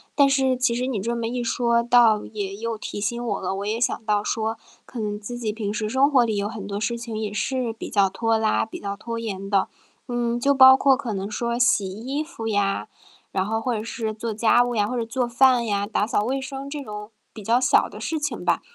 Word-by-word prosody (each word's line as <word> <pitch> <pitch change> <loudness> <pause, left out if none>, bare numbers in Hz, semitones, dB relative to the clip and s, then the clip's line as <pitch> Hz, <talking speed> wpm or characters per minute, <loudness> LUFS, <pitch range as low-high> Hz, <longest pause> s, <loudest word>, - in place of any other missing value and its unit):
但 280 -1 +6
是 265 -2 +2
其 250 -2 +2
实 250 +2 -1
你 245 -6 -2
这 235 +5 -2
么 230 -1 -2
一 245 +1 -2
说， 235 0 +1
倒 235 -3 +4
也 200 -2 -5
又 230 +2 -3
提 210 - -6
醒 235 +4 -2
我 235 - -2
了， 190 0 -2
我 200 +1 -4
也 215 +2 -1
想 235 -2 0
到 210 -1 +1
说 220 +1 -2 0.3
可 245 - -8
能 210 -1 -2
自 240 +3 -7
己 220 -3 -2
平 210 -2 -3
时 215 -1 -2
生 265 +5 +3
活 255 -4 +5
里 220 -2 -1
有 200 +1 -1
很 215 -3 -7
多 200 0 -4
事 235 +2 -1
情 230 -1 -6
也 215 -2 -3
是 245 +3 -1
比 220 - -8
较 200 -3 +3
拖 225 +3 0
拉、 220 -1 +1
比 220 - -9
较 200 0 -5
拖 230 +2 -5
延 195 -3 -5
的。 195 -2 +2 0.4
嗯， 240 -1 -1
就 280 +3 +3
包 265 -1 +9
括 270 0 +4
可 230 -4 -4
能 195 +1 -4
说 235 +2 -2
洗 210 -5 +3
衣 250 +9 -4
服 305 -8 -8
呀， 200 -2 0 0.4
然 190 0 0
后 225 +2 -1
或 245 +1 -1
者 215 - -2
是 225 -1 -4
做 220 +1 -4
家 225 +3 +4
务 245 0 0
呀， 205 -2 +2
或 250 +4 -3
者 230 - -1
做 245 +2 -1
饭 240 0 +4
呀， 205 -1 -1
打 210 -1 0
扫 210 -1 0
卫 270 +3 -1
生 270 +1 -6
这 290 0 -5
种 210 -2 -8 0.2
比 215 - -9
较 230 +4 +2
小 255 - +3
的 - - -10
事 320 - -2
情 295 -1 -3
吧。 - - +2
230 Hz, 270 characters per minute, -24 LUFS, 210-245 Hz, 0.4 s, 包